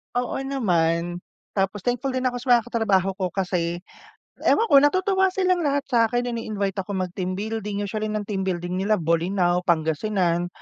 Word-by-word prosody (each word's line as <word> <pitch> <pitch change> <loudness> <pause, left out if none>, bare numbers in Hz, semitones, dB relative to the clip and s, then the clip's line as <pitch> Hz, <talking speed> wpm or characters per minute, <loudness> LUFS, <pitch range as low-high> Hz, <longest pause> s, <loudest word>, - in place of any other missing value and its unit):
Oo 245 +2 -1
naman. 175 -10 0 0.4
Tapos 195 +1 0
thankful 250 +2 -1
din 255 0 -1
ako 245 - -5
sa 250 - -11
mga 235 -2 +4
katrabaho 195 -5 +2
ko 185 -3 -2
kasi, 175 -2 -1 0.6
ewan 455 - +4
ko 280 - +5
natutuwa 380 +5 +3
silang 365 -1 +1
lahat 285 -2 0
sa'kin, 240 +1 +2
ini-invite 210 -5 -2
ako 195 +1 -4
mag 185 -1 -2
team 185 0 -3
building, 210 -1 -3
usually 215 +2 -3
ng 215 -1 -2
team 200 -2 -3
building 180 0 -2
nila 210 +2 +2
Bolinao, 175 +2 +1
Pangasinan. 175 +2 0
200 Hz, 165 wpm, -24 LUFS, 180-245 Hz, 0.6 s, ko